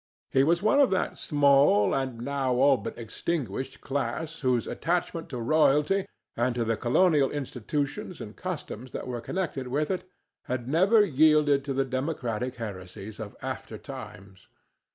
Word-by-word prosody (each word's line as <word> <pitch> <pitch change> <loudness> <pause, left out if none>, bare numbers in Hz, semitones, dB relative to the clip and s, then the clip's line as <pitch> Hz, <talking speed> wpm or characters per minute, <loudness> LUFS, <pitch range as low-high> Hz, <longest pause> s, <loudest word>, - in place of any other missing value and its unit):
He 135 - +4
was 170 +5 +2
one 250 +7 +4
of 280 - +6
that 190 -1 -1
small, 140 -8 +4
and 130 -4 -2
now 135 -1 0
all 135 +2 +5
but - - -6
extinguished, 130 - -3
class 155 +4 -3
whose 125 -4 +1
attachment 170 0 -2
to 125 - -5
royalty, 150 +8 +3 0.3
and 120 +1 0
to 120 -1 0
the 115 0 +1
colonial 140 +4 +3
institutions 145 - -3
and 105 0 -8
customs 145 -9 -6
that - - -4
were 120 -2 -4
connected 155 -4 -3
with 145 +6 -1
it, 185 0 -4 0.4
had 125 -1 -3
never 195 - +5
yielded 150 -3 +4
to 140 - -2
the 135 0 +1
democratic 130 -3 -2
heresies 100 -1 -7
of 105 -2 -7
after - - -5
times. 95 -1 -10
135 Hz, 155 wpm, -27 LUFS, 120-160 Hz, 0.4 s, of